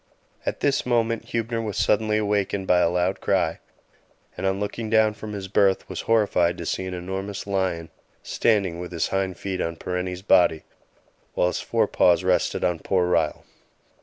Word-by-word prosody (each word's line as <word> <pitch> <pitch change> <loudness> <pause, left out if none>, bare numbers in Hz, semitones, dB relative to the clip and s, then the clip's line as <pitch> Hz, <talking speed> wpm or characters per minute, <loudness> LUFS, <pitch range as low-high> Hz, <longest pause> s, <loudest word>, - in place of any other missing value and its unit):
At - - -2
this 140 -1 +2
moment 115 -2 0
Huebner 115 0 -2
was 105 -3 -4
suddenly 110 0 +2
awakened 100 -2 0
by 90 -1 +4
a 85 - +3
loud 90 +2 0
cry, - - +1 0.8
and - - -2
on 95 +1 0
looking 110 +2 -4
down 110 -1 +4
from 105 0 -8
his 100 -2 -5
berth 95 -1 +2
was - - -5
horrified 100 -6 +3
to 85 - -6
see 95 +3 -2
an 90 - -4
enormous 95 +3 -5
lion 95 -4 -1 0.3
standing 100 -7 +1
with 90 0 -6
his 85 -2 -1
hind 95 -2 -1
feet 95 -2 -3
on 85 0 -2
Parenti's 90 +2 -4
body, 90 -5 +4 0.7
while - - +2
his 90 - -1
forepaws 90 +1 +2
rested 90 0 +1
on 90 -2 +1
poor 90 +1 +1
Ryall. 80 -3 +1
95 Hz, 170 wpm, -24 LUFS, 90-105 Hz, 0.8 s, by